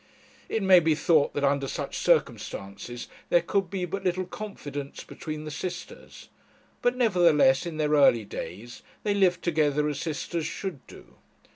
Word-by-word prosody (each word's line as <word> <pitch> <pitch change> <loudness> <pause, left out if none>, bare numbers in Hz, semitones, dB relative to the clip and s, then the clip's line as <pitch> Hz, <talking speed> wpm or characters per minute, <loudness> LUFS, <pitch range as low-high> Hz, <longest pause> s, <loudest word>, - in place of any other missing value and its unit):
It 225 - -1
may 190 -1 +8
be 160 -2 +2
thought 155 -2 +2
that 145 - -1
under 140 0 +2
such - - -4
circumstances 100 +5 -1 0.2
there 175 -1 +4
could 195 0 0
be 185 -1 -2
but 195 +3 -5
little 185 0 0
confidence 145 -9 -7
between 155 -1 -7
the 155 - -5
sisters; 175 +3 -7 0.5
but, 245 +1 +2
nevertheless, 175 - +4
in 160 -2 -5
their 150 -1 0
early 140 -7 +5
days, 100 +6 -8 0.2
they 205 - +1
lived 190 -3 +2
together 150 -3 +1
as 145 -2 -3
sisters 160 +1 -3
should 180 -10 -6
do. - - -15
160 Hz, 155 wpm, -27 LUFS, 145-185 Hz, 0.5 s, may